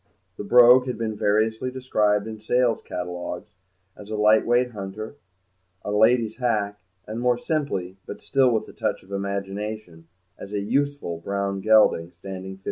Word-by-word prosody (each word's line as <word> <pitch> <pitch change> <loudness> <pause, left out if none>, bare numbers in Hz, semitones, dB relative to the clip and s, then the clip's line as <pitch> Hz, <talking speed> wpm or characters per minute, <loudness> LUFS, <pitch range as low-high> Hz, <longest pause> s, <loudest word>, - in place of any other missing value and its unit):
The - - -6
Brogue 125 +3 +6
had 125 - -3
been 110 -2 -3
variously 110 +4 +1
described 105 -5 0
in 110 -1 -7
sale 120 +1 +2
catalogues 90 0 -6 0.4
as 105 0 -12
a 110 - -3
light 105 +1 +4
weight 120 +1 +2
hunter, 105 +2 -7 0.7
a 105 - -2
lady's 110 +1 +3
hack, 105 -5 -1 0.3
and, 110 +2 -5
more 125 0 +2
simply, 120 - -3
but - - -7
still 135 -2 +3
with 110 -3 0
a - - -12
touch - - -2
of 95 - -18
imagination, 100 -2 -5 0.3
as 100 - -9
a 105 - 0
useful 140 -5 -1
brown 100 +1 -3
gelding, 105 -5 +4
standing 95 +1 -7
15. 95 - -14
105 Hz, 160 wpm, -24 LUFS, 100-120 Hz, 0.7 s, Brogue